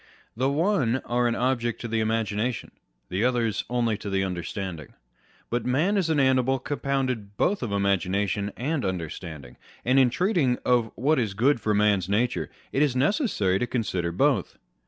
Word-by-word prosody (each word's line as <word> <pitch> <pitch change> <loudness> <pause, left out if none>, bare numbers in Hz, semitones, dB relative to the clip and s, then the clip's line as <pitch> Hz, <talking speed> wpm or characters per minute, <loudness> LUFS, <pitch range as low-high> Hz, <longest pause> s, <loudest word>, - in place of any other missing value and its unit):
The 130 +4 +1
one 150 - +1
are 120 0 +1
an 120 - 0
object 120 -2 0
to 120 - -4
the 115 0 0
imagina 110 +1 0
tion: 120 - -8 0.4
the 95 +4 -1
others 120 -5 +1
only 115 -3 0
to 105 - -5
the 95 0 +1
understanding. 90 -3 -5 0.6
But 120 +1 0
man 155 +11 +1
is 185 -5 +1
an 155 -2 +2
animal 130 -1 +3
compounded 130 -7 -2
both 200 +2 +1
of 120 -5 -3
imagination 100 +1 0
and 140 +4 -1
under 90 -5 -2
standing; 70 -8 -9 0.3
and, 130 +3 +4
in 130 -2 +5
treating 165 - +1
of 120 -2 +3
what 140 +4 +2
is 105 -5 -1
good 125 +3 +2
for 105 0 +1
man's 100 -3 +2
natuife, 115 +5 0 0.2
it 135 - +1
is 145 -4 +2
necessary 130 - +1
to 125 - -1
consider 95 -8 -1
both. 120 +2 +1
120 Hz, 175 wpm, -26 LUFS, 100-130 Hz, 0.6 s, in